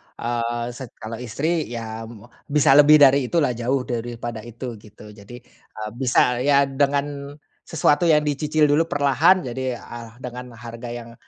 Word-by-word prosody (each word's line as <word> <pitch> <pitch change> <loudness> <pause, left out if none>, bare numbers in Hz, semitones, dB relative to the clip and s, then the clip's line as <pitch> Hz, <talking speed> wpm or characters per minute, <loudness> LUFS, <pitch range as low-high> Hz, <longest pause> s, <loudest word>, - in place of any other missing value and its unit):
eee, 120 0 -3
set 125 +2 -8
kalau 110 +1 -8
istri 145 +7 -2
ya, 115 -1 -6
mmm, 115 -3 -12 0.2
bisa 145 -1 +3
lebih 150 +1 +8
dari 140 -3 +5
itu 170 +2 +1
lah, 130 - +1
jauh 125 +3 -1
daripada 120 -1 -5
itu, 120 0 -8
gitu. 105 0 -15
Jadi, 105 +3 -13
eee, 110 -3 -10
bisa, 125 -1 +2
ya, 140 +2 +4
dengan 140 +1 -2 0.3
sesuatu 165 +1 +2
yang 150 -2 +4
dicicil 150 +1 +1
dulu 160 +3 +2
perlahan 155 +6 +3
jadi 130 0 -3
eh 115 0 -10
dengan 125 -1 -8
harga 115 +1 -8
yang 120 -1 -8
125 Hz, 160 wpm, -22 LUFS, 115-145 Hz, 0.3 s, lebih